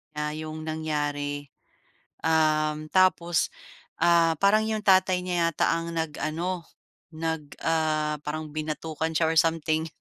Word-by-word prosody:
niya 150 Hz, -, -2 dB, 0.2 s
'yong 155 Hz, 0 st, -6 dB
nangyari. 145 Hz, -2 st, -2 dB, 0.7 s
Uhm, 155 Hz, -1 st, +1 dB
tapos, 175 Hz, -3 st, +3 dB, 0.5 s
ah, 170 Hz, -1 st, +4 dB
parang 205 Hz, +4 st, +4 dB
'yong 215 Hz, -1 st, -2 dB
tatay 185 Hz, -1 st, +4 dB
niya 175 Hz, -2 st, +1 dB
yata 165 Hz, -, +1 dB
ang 165 Hz, 0 st, -3 dB
nag-ano 165 Hz, +2 st, -3 dB, 0.4 s
nag, 160 Hz, 0 st, -3 dB, 0.2 s
ah, 155 Hz, -2 st, 0 dB
parang 155 Hz, 0 st, -5 dB
binatukan 155 Hz, +1 st, -3 dB
siya 165 Hz, -, +2 dB
or 160 Hz, -, -1 dB
something 160 Hz, 0 st, +1 dB
160 Hz, 120 wpm, -26 LUFS, 155-170 Hz, 0.7 s, ah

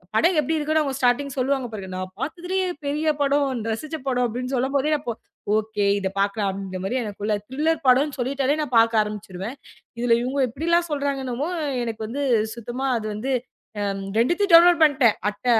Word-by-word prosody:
படம் 340 Hz, +11 st, +4 dB
எப்படி 305 Hz, +2 st, 0 dB
இருக்குன்னு 310 Hz, +1 st, +1 dB
அவங்க 275 Hz, -3 st, -2 dB
ஸ்டார்டிங் 270 Hz, +2 st, +1 dB
சொல்லுவாங்க 265 Hz, 0 st, 0 dB
பாருங்க. 200 Hz, -3 st, -7 dB
நான் 185 Hz, 0 st, -5 dB
பாத்ததுலயே 360 Hz, +5 st, -2 dB, 0.2 s
பெரிய 300 Hz, +3 st, -1 dB
படம், 275 Hz, -4 st, +1 dB
ரசிச்ச 305 Hz, +8 st, -4 dB
படம் 250 Hz, -1 st, +1 dB
அப்படின்னு 250 Hz, +3 st, -4 dB
சொல்லும்போதே 275 Hz, +4 st, +1 dB
அப்போ 240 Hz, -5 st, -4 dB, 0.4 s
ஓகே, 215 Hz, -1 st, -1 dB, 0.2 s
இத 195 Hz, -, -1 dB
பாக்கலாம். 200 Hz, -1 st, 0 dB
இந்த 185 Hz, 0 st, -5 dB
மாரி 195 Hz, +6 st, -2 dB
எனக்குள்ள 210 Hz, -1 st, -3 dB
த்ரில்லர் 305 Hz, +5 st, 0 dB
படோன் 275 Hz, +3 st, +4 dB
சொல்லிட்டாலே 270 Hz, +2 st, 0 dB
நான் 260 Hz, -4 st, -4 dB
பாக்க 230 Hz, 0 st, +5 dB
ஆரம்பிச்சுடுவேன். 210 Hz, +2 st, -5 dB, 0.4 s
இதுல 240 Hz, -1 st, +3 dB
இவங்க 260 Hz, +3 st, -2 dB
இப்படி 290 Hz, +8 st, -5 dB
எல்லாம் 340 Hz, 0 st, +3 dB
சொல்றாங்கனவே 280 Hz, 0 st, -2 dB, 0.3 s
எனக்கு 225 Hz, -1 st, -5 dB
வந்து 265 Hz, +6 st, -4 dB, 0.3 s
சுத்தமா 240 Hz, +3 st, -4 dB
அது 220 Hz, -, -5 dB
வந்து 245 Hz, +6 st, -3 dB, 0.5 s
அ. -, -, -1 dB, 0.4 s
2த்தையும் 345 Hz, -, +2 dB
டவுன்லோட் 340 Hz, 0 st, +8 dB
பண்ணிட்டேன். 270 Hz, -7 st, +4 dB
அட்ட 210 Hz, -, -11 dB
260 Hz, 165 wpm, -23 LUFS, 225-295 Hz, 0.5 s, டவுன்லோட்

